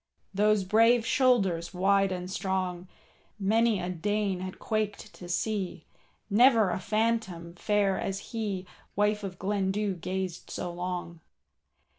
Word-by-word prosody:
Those 210 0 +3
brave 225 +4 +4
shoulders 195 -12 +2
wide 195 +1 +3
and 180 -1 -4
strong, 185 -1 -2 0.5
Many 220 +1 +2
a 180 - -3
Dane 195 +2 -1
had 185 0 -6
quaked 215 -1 -3
to 175 - -11
see, 190 -3 -2 0.4
Never 220 -2 +5
a - - -2
phantom 210 -5 -1
fair 200 +1 +1
as 195 +1 -4
he,— 205 -5 -2 0.3
Wife 210 +1 +1
of 190 -2 -5
Glendu 200 +1 0
gazed 185 0 -4
so 175 -1 -4
long. 175 -1 -4
195 Hz, 125 wpm, -29 LUFS, 180-215 Hz, 0.5 s, Never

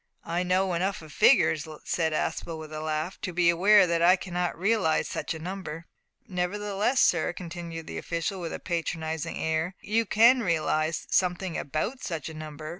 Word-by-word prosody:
"I 170 +1 -1
know 185 +1 +1
enough 185 +1 -1
of 155 -2 -12
figures," 160 -2 +4 0.2
said 160 -2 0
Aspel, 160 +1 -2
with 155 -1 -9
a 155 - -4
laugh, 155 +3 -3
"to 185 - -3
be 175 0 +4
aware 195 +3 +6
that 170 -1 0
I 180 +2 +7
cannot 180 -2 -3
realise 190 -3 +1
such - - -3
a - - -5
number." 170 -1 -6 0.4
"Nevertheless, 205 +6 -1
sir," 170 0 +3
continued 170 -2 -7
the - - -5
official, 170 +3 -3
with 165 - -4
a - - -5
patronising 160 -2 -3
air, 160 +3 -1
"you 225 +2 0
can 235 +5 +5
realise 160 -3 0
something 180 -1 +1
about 180 - -3
such 165 -2 -4
a - - -8
number. 155 0 -8
170 Hz, 175 wpm, -27 LUFS, 160-190 Hz, 0.4 s, I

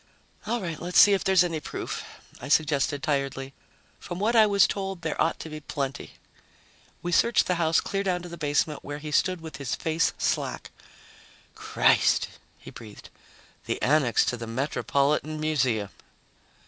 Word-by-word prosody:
"All 240 +2 0
right, 170 -6 -5
let's 180 +1 -2
see 205 - +8
if 195 - +1
there's 190 -2 +4
any 165 -3 -2
proof," - - -5 0.4
I 130 - -6
suggested 145 -1 +1
tiredly. 135 -1 -2 0.5
"From 175 - -7
what 215 +5 0
I 220 -2 +7
was 200 -1 +5
told, 195 -3 -4
there 160 - -2
ought 165 - +1
to - - -7
be 155 0 -7
plenty." 140 -2 -5 0.9
We 175 - -2
searched 235 +7 +3
the 180 - +1
house 160 0 +3
clear 195 - -2
down 180 -3 -1
to - - -7
the 170 - -7
basement, 150 -1 -1
where 145 0 -6
he 150 0 -7
stood 185 +3 +1
with 160 -1 -8
his 140 -4 -3
face 160 0 0
slack. - - -2 0.8
"Christ!" - - +2 0.3
he - - -12
breathed. 110 -3 -12 0.6
"The - - -2
annex 135 -3 +3
to 125 - -1
the 115 0 -7
Metropolitan 140 +4 -1
Museum!" 130 -10 0
155 Hz, 165 wpm, -26 LUFS, 140-180 Hz, 0.9 s, see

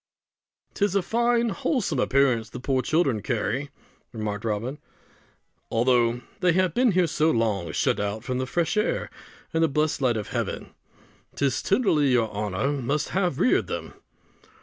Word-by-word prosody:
"'Tis 200 -2 0
a 200 - +3
fine 235 +3 +1
wholesome 245 +3 -1
appearance 125 -5 +2
the - - -8
poor 130 +1 0
children 140 -8 +1
carry," 125 +4 -2 0.4
remarked 110 -2 -4
Robin, 115 +6 -3 0.9
"although 120 0 +2 0.2
they 180 -2 +3
have 185 -2 +2
been 245 -1 +3
here 180 0 +3
so 155 0 +1
long 105 - 0
shut - - +1
out 105 +2 -3
from 130 -1 -2
the 130 - -2
fresh 165 +2 0
air 210 +1 0 0.4
and 165 0 +2
the - - +5
blessed 150 0 0
light 120 -4 +2
of 105 - -5
heaven. - - -3 0.6
'Tis 140 -2 0
tenderly 190 - +2
your 120 -4 +2
honour 105 +5 -1
must 140 +5 -1
have 180 -7 0
reared 255 - +3
them!" - - -5
135 Hz, 155 wpm, -25 LUFS, 115-175 Hz, 0.9 s, the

